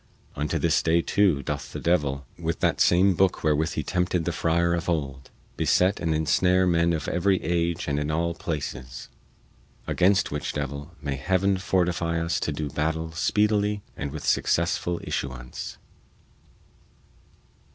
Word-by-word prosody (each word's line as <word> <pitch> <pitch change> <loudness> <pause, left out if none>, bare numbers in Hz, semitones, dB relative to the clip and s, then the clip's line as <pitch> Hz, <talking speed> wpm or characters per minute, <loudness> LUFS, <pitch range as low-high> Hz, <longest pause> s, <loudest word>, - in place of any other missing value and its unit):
Unto 75 +1 -1
this - - +2
day, 85 +1 +3
too, 90 -9 +2
doth - - -4
the - - -4
devil, 70 -6 0
with 80 -1 -2
that - - +1
same 95 +3 +5
booke 95 +1 +1
wherewith 80 +1 +1
he 80 - -2
tempted 90 +1 0
the 85 - 0
friar 85 +1 +1
of 85 0 -2
old, 70 -5 -3 0.3
beset 95 +3 +2
and 80 -3 0
ensnare 90 +4 +3
men 85 -1 +3
of 80 -3 -2
every 95 +1 +2
age 85 0 -1
and 70 0 0
in 75 0 -2
all 85 +2 0
places. 65 -7 -5 0.8
Against 95 +3 +2
which 75 0 -3
devil 70 +3 -5
may 70 -2 -2
Heaven 95 +6 +1
fortify 90 -3 0
us 85 +1 -1
to - - -2
do 75 +1 -3
battle 80 +2 -2
speedily 105 +3 +1
and 70 - -4
with 75 0 -6
successful 85 0 +1
issuance. 65 -2 -5
85 Hz, 150 wpm, -25 LUFS, 75-90 Hz, 0.8 s, same